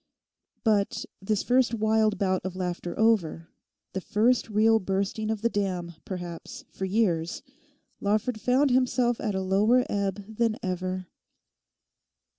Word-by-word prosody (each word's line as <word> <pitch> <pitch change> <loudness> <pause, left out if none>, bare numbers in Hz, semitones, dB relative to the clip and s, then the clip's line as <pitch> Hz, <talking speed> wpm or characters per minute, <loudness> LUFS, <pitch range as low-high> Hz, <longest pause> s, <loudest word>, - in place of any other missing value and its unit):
But 210 -3 +1 0.2
this 200 +1 0
first 250 -1 +3
wild 220 -1 +2
bout 185 -1 +1
of 185 0 -4
laughter 180 -1 -4
over, 180 -8 +2 0.4
the 190 - -2
first 230 +5 +2
real 220 +1 +4
bursting 195 +3 -2
of 220 -1 -2
the - - +4
dam, 185 -5 -2
perhaps, 175 -3 -7
for 190 - -4
years, 185 -5 0 0.6
Lawford 215 +3 0
found 255 +4 +3
himself 250 -1 +2
at 210 -3 -2
a 190 - 0
lower 210 +7 +3
ebb 200 0 -1
than 230 -2 +2
ever. 185 0 -2
205 Hz, 130 wpm, -27 LUFS, 185-225 Hz, 0.6 s, real